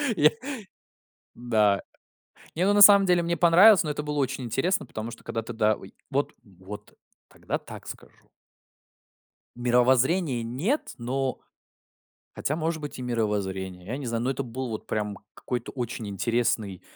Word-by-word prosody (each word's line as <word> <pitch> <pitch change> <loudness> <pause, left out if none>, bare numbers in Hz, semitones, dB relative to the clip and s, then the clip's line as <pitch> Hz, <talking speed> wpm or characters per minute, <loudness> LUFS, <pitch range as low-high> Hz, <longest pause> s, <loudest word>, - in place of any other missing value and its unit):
Я 155 -2 +5 1.0
Да. 110 -5 +2 0.7
Не, 175 +3 +1
ну, 200 - +3
на 205 - +4
самом 200 -1 +9
деле 180 -2 +3
мне 170 0 -1
понравилось, 180 +4 +7
но 155 - -2
это 150 - -3
было 150 0 -3
очень 135 -1 -1
интересно, 135 - 0
потому 115 -1 -6
что 115 - -12
когда 115 - -3
тогда 110 -2 +1
ой. 95 - -13 0.2
Вот, 140 +2 0
вот 100 +1 -11 0.3
тогда - - -4
так - - -11
скажу - - -10 1.4
Мировоззрение- 125 +4 +2
нет, 145 - -2
но 130 +2 -2 1.0
Хотя, 150 - -1
может 160 0 -2
быть, 145 -3 -7
и - - -5
мировоззрение, 95 -6 -2
я 120 +6 -3
не 140 -2 -6
знаю, 115 0 -2
но - - 0
это 135 - -2
был 130 +1 -5
вот 110 - -6
прям 105 -1 -2 0.2
какой-то 120 -2 -4
очень 115 -4 -5
интересный 105 -2 -1
125 Hz, 150 wpm, -26 LUFS, 110-150 Hz, 1.4 s, самом